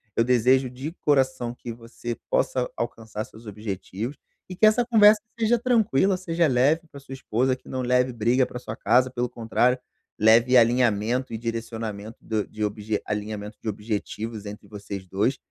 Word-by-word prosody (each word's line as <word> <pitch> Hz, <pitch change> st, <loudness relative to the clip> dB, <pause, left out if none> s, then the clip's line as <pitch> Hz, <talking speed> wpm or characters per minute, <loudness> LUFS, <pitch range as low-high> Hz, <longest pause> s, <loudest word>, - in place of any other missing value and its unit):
eu 115 Hz, -, +3 dB
desejo 125 Hz, +2 st, +3 dB
de 130 Hz, +5 st, -6 dB
coração 130 Hz, -6 st, +1 dB
que 120 Hz, -1 st, -8 dB
você 120 Hz, 0 st, -7 dB
possa -, -, +1 dB
alcançar 110 Hz, -1 st, -4 dB
seus 110 Hz, +1 st, -16 dB
objetivos, 105 Hz, +3 st, -5 dB, 0.3 s
e 185 Hz, -, -6 dB
que 205 Hz, -, +4 dB
essa 225 Hz, +3 st, +4 dB
conversa 215 Hz, -3 st, +6 dB, 0.2 s
seja 230 Hz, +1 st, +3 dB
tranquila, 210 Hz, -, +2 dB
seja 170 Hz, -2 st, 0 dB
leve 140 Hz, +4 st, +3 dB
pra 140 Hz, -, -11 dB
sua 135 Hz, -1 st, -11 dB
esposa 130 Hz, 0 st, 0 dB
que 130 Hz, -, -17 dB
não 130 Hz, -, -3 dB
leve 125 Hz, 0 st, +2 dB
briga 120 Hz, +3 st, +2 dB
para 125 Hz, -, -7 dB
sua 110 Hz, -3 st, -7 dB
casa, 130 Hz, +1 st, +3 dB
pelo 125 Hz, -1 st, -2 dB
contrário, 125 Hz, +2 st, +1 dB, 0.4 s
leve 115 Hz, +4 st, +6 dB
alinhamento 120 Hz, +1 st, +2 dB
e -, -, -2 dB
direcionamento 115 Hz, -2 st, -5 dB
do 110 Hz, -2 st, -2 dB
de 110 Hz, -, -10 dB
obje 105 Hz, 0 st, -3 dB
alinhamento 105 Hz, 0 st, -4 dB
de 110 Hz, -, -3 dB
objetivos 105 Hz, +1 st, -4 dB
entre 105 Hz, +1 st, -9 dB
vocês 100 Hz, -2 st, -7 dB
dois, 105 Hz, +9 st, 0 dB
120 Hz, 165 wpm, -25 LUFS, 110-135 Hz, 0.4 s, conversa